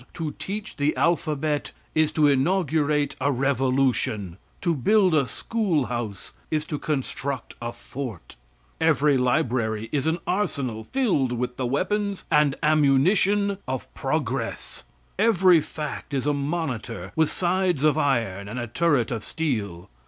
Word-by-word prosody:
To 160 Hz, -3 st, -3 dB
teach 205 Hz, +2 st, -5 dB
the 145 Hz, +1 st, +1 dB
alphabet 155 Hz, -3 st, 0 dB, 0.2 s
is 155 Hz, -1 st, +2 dB
to 155 Hz, -, +3 dB
inaugurate 150 Hz, 0 st, +2 dB
a 140 Hz, +2 st, +2 dB
revolution; 130 Hz, -7 st, +1 dB, 0.2 s
to 170 Hz, -3 st, +1 dB
build 185 Hz, -, +3 dB
a 140 Hz, -4 st, +3 dB
schoolhouse 125 Hz, -, -2 dB, 0.2 s
is 155 Hz, -1 st, -1 dB
to 150 Hz, -, -4 dB
construct 140 Hz, -3 st, -3 dB
a 120 Hz, 0 st, -3 dB
fort; 120 Hz, -, -8 dB, 0.4 s
every 145 Hz, +1 st, +3 dB
library 125 Hz, -4 st, 0 dB
is 145 Hz, -1 st, 0 dB
an 160 Hz, +1 st, +2 dB
arsenal 135 Hz, -, -2 dB
filled 190 Hz, -, +1 dB
with 125 Hz, +1 st, -3 dB
the 130 Hz, -, -1 dB
weapons 200 Hz, +8 st, -1 dB
and 150 Hz, -2 st, +4 dB
ammunition 180 Hz, +8 st, +3 dB
of 130 Hz, -1 st, -4 dB
progress; -, -, -3 dB, 0.3 s
every 190 Hz, -6 st, +5 dB
fact 150 Hz, -1 st, -6 dB
is 135 Hz, -, -1 dB
a 150 Hz, -, +2 dB
monitor 130 Hz, -, -3 dB
with 160 Hz, -1 st, +2 dB
sides 180 Hz, -4 st, 0 dB
of 155 Hz, -2 st, +4 dB
iron 115 Hz, -10 st, 0 dB
and 110 Hz, +5 st, -6 dB
a 120 Hz, -, -2 dB
turret 140 Hz, -1 st, +1 dB
of 115 Hz, -2 st, -3 dB
steel. 105 Hz, -, -3 dB
145 Hz, 135 wpm, -25 LUFS, 125-165 Hz, 0.4 s, every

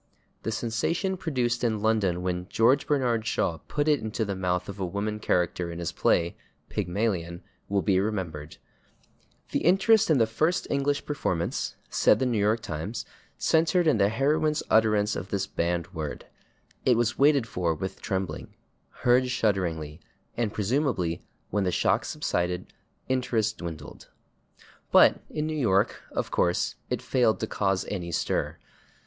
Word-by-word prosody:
The 115 Hz, -, -3 dB
sensation 125 Hz, -, -1 dB
produced 125 Hz, -9 st, -1 dB
in 110 Hz, -3 st, 0 dB
London 100 Hz, -6 st, +1 dB
when 90 Hz, 0 st, -2 dB
George 120 Hz, +5 st, +3 dB
Bernard 120 Hz, -6 st, +1 dB
Shaw 80 Hz, -6 st, 0 dB
put 145 Hz, 0 st, -1 dB
it 150 Hz, -2 st, +4 dB
into 110 Hz, +1 st, -2 dB
the 100 Hz, -1 st, -3 dB
mouth 90 Hz, -1 st, -1 dB
of 100 Hz, 0 st, -7 dB
a -, -, -1 dB
woman 105 Hz, +4 st, -3 dB
character 90 Hz, -3 st, 0 dB
in 85 Hz, -, -7 dB
his 85 Hz, -2 st, -3 dB
play, 85 Hz, 0 st, +1 dB, 0.3 s
"Pygmalion," 90 Hz, -3 st, -2 dB, 0.3 s
will 100 Hz, -2 st, +1 dB
be 95 Hz, +2 st, +3 dB
remembered. 90 Hz, -8 st, -3 dB, 0.9 s
"The -, -, +1 dB
interest 195 Hz, +5 st, +4 dB
in 155 Hz, -, +5 dB
the 115 Hz, -, +4 dB
first 155 Hz, +10 st, 0 dB
English 140 Hz, 0 st, 0 dB
performance," 90 Hz, -, -2 dB
said -, -, +4 dB
the 130 Hz, -, 0 dB
/New 120 Hz, -4 st, +1 dB
York 105 Hz, +3 st, +2 dB
Times/, 80 Hz, +8 st, -5 dB, 0.3 s
"centered 165 Hz, +2 st, +2 dB
in 150 Hz, -9 st, +3 dB
the 100 Hz, 0 st, +4 dB
heroine's 150 Hz, +6 st, +1 dB
utterance 105 Hz, -1 st, +3 dB
of 90 Hz, +4 st, -5 dB
this 95 Hz, -1 st, -1 dB
banned 85 Hz, -1 st, -2 dB
word. 75 Hz, -4 st, -5 dB, 0.6 s
It 125 Hz, -3 st, +4 dB
was 120 Hz, -1 st, 0 dB
waited 140 Hz, -3 st, +5 dB
for 85 Hz, -6 st, -1 dB
with 95 Hz, +4 st, -6 dB
trembling, 95 Hz, -2 st, -4 dB, 0.5 s
heard 125 Hz, +1 st, +4 dB
shudderingly, 85 Hz, -10 st, -1 dB, 0.4 s
and 115 Hz, -3 st, -1 dB
presumably, 105 Hz, -, 0 dB, 0.3 s
when 105 Hz, 0 st, +1 dB
the 90 Hz, -, +1 dB
shock -, -, +1 dB
subsided, 90 Hz, +1 st, -2 dB, 0.3 s
interest 115 Hz, -4 st, 0 dB
dwindled." 80 Hz, -3 st, -8 dB, 0.8 s
But -, -, +6 dB
in 150 Hz, -, -2 dB
New 155 Hz, 0 st, -2 dB
York, 100 Hz, -9 st, +1 dB
of -, -, -3 dB
course, 90 Hz, 0 st, +1 dB, 0.2 s
it -, -, -2 dB
failed 115 Hz, -6 st, +2 dB
to -, -, +1 dB
cause 95 Hz, -2 st, 0 dB
any 90 Hz, -4 st, -4 dB
stir. -, -, -1 dB
105 Hz, 155 wpm, -27 LUFS, 90-125 Hz, 0.9 s, But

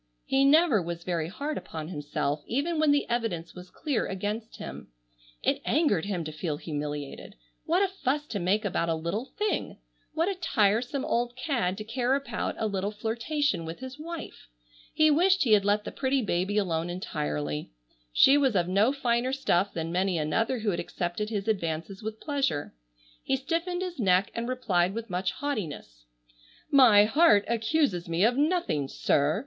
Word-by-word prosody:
He 270 Hz, +1 st, +3 dB
never 295 Hz, -, +5 dB
was 170 Hz, 0 st, -5 dB
very 170 Hz, -3 st, -1 dB
hard 285 Hz, -, -4 dB
upon 160 Hz, 0 st, -7 dB
himself 145 Hz, -2 st, -2 dB
even 305 Hz, +6 st, -1 dB
when 310 Hz, -1 st, +3 dB
the 285 Hz, 0 st, +3 dB
evidence 225 Hz, -9 st, -2 dB
was 180 Hz, 0 st, -11 dB
clear 290 Hz, -, -2 dB
against 210 Hz, +4 st, -4 dB
him. -, -, -8 dB, 0.6 s
It -, -, +1 dB
angered 240 Hz, -, +2 dB
him 190 Hz, -4 st, -2 dB
to 155 Hz, -, -5 dB
feel 155 Hz, 0 st, -3 dB
humiliated. 145 Hz, -2 st, -5 dB, 0.3 s
What 355 Hz, +5 st, +3 dB
a -, -, +3 dB
fuss 295 Hz, -6 st, -2 dB
to 205 Hz, -, -2 dB
make 200 Hz, +5 st, +1 dB
about 170 Hz, -3 st, 0 dB
a 165 Hz, -, +1 dB
little 170 Hz, +9 st, -3 dB
thing! 420 Hz, 0 st, -1 dB, 0.4 s
What 325 Hz, +2 st, +1 dB
a 400 Hz, -, +1 dB
tiresome 250 Hz, -, +1 dB
old 240 Hz, +1 st, 0 dB
cad 245 Hz, -, -1 dB
to 215 Hz, -, -5 dB
care 245 Hz, +4 st, 0 dB
about 275 Hz, -5 st, -3 dB
a -, -, -1 dB
little 200 Hz, -1 st, -1 dB
flirtation 230 Hz, -, -1 dB
with 165 Hz, +1 st, -6 dB
his 260 Hz, +2 st, -9 dB
wife! 335 Hz, +1 st, -8 dB, 0.4 s
He 310 Hz, 0 st, +4 dB
wished 365 Hz, +4 st, +4 dB
he 240 Hz, -, +1 dB
had 205 Hz, -2 st, +5 dB
let 205 Hz, +1 st, +2 dB
the -, -, -6 dB
pretty 265 Hz, -1 st, 0 dB
baby 195 Hz, +1 st, 0 dB
alone 170 Hz, -4 st, 0 dB
entirely. 75 Hz, -, -3 dB, 0.4 s
She 275 Hz, -, +6 dB
was 265 Hz, -6 st, +2 dB
of 175 Hz, -2 st, +2 dB
no 200 Hz, +7 st, +3 dB
finer 250 Hz, -2 st, 0 dB
stuff 200 Hz, -8 st, +1 dB
than 165 Hz, 0 st, -4 dB
many 185 Hz, 0 st, +1 dB
another 225 Hz, +12 st, 0 dB
who 210 Hz, -1 st, +1 dB
had 170 Hz, -, -2 dB
accepted 175 Hz, +4 st, -3 dB
his 205 Hz, -2 st, -3 dB
advances 180 Hz, -2 st, -2 dB
with 220 Hz, 0 st, -5 dB
pleasure. 280 Hz, -, -1 dB, 0.5 s
He 270 Hz, -, 0 dB
stiffened 335 Hz, +6 st, -2 dB
his 360 Hz, -4 st, -6 dB
neck 190 Hz, -2 st, +3 dB
and 235 Hz, +1 st, -3 dB
replied 195 Hz, -7 st, +1 dB
with 230 Hz, -3 st, -5 dB
much 185 Hz, +1 st, 0 dB
haughtiness: 160 Hz, -, -5 dB, 0.7 s
"My 230 Hz, -7 st, +7 dB
heart 245 Hz, -3 st, +5 dB
accuses 225 Hz, -, 0 dB
me 170 Hz, +3 st, +1 dB
of 235 Hz, +3 st, +4 dB
nothing, 290 Hz, -, +1 dB
sir. 145 Hz, +5 st, +1 dB
215 Hz, 175 wpm, -28 LUFS, 175-275 Hz, 0.7 s, My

